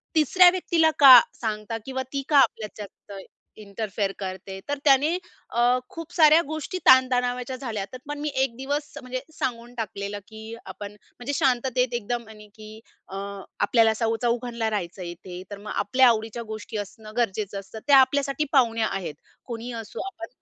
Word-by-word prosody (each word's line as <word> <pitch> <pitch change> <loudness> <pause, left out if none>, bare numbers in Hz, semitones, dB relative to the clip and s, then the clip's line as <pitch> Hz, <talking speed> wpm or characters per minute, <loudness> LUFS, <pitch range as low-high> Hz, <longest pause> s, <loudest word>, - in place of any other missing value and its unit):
तिसऱ्या 355 +4 +6
व्यक्तीला 335 -3 +2
का 265 -4 +11 0.2
सांगता 215 0 -3
किंवा 260 0 -3
ती 275 0 -2
का 295 - +4
आपल्याच्यात 210 -5 0 0.2
जास्त 200 -1 -8 0.4
इंटरफेअर 200 -1 -3
करते?" 190 0 -6
तर 290 - -1
त्याने 290 +5 +4 0.3
अ, - - -2 0.3
खूप 330 +1 -9
साऱ्या 315 -1 +7
गोष्टी 315 +4 -4
ताण-तणावाच्या 250 -1 +4
झाल्या. 230 -6 -4
त्यात 250 +6 -11
पण 295 0 -4
मी 300 +1 -2
एक 265 -3 0
दिवस 285 +3 -3
म्हणजे 255 0 -4
सांगून 240 -3 -4
टाकलेलं 205 -3 -4
की 220 +1 -9
आपण 200 +2 -8
म्हणजे 245 +6 -8
शांततेत 250 -1 +1
एकदम 240 0 -3
आणि 210 -1 -13
की 215 0 -11 0.3
अ, 195 - -6 0.4
आपल्याला 225 -2 +4
सौ 225 0 0
चौघांना 235 -1 -1
राहायचंय 180 -3 -4
इथे 180 +1 -9
तर 205 - -6
मग 210 - -8
आपल्या 260 0 +4
आवडीच्या 225 +1 -1
गोष्टी 220 0 -7
असणं 215 +1 -8
गरजेचं 205 -3 -1
असतं. 195 +3 -11
त्या 280 - +7
आपल्यासाठी 275 +2 +2
पाहुण्या 230 -5 +3
आहेत. 190 -5 -4 0.3
कोणीही 235 0 -6
असो 225 -2 -7
आपण 340 -3 -8
235 Hz, 160 wpm, -25 LUFS, 215-265 Hz, 0.4 s, का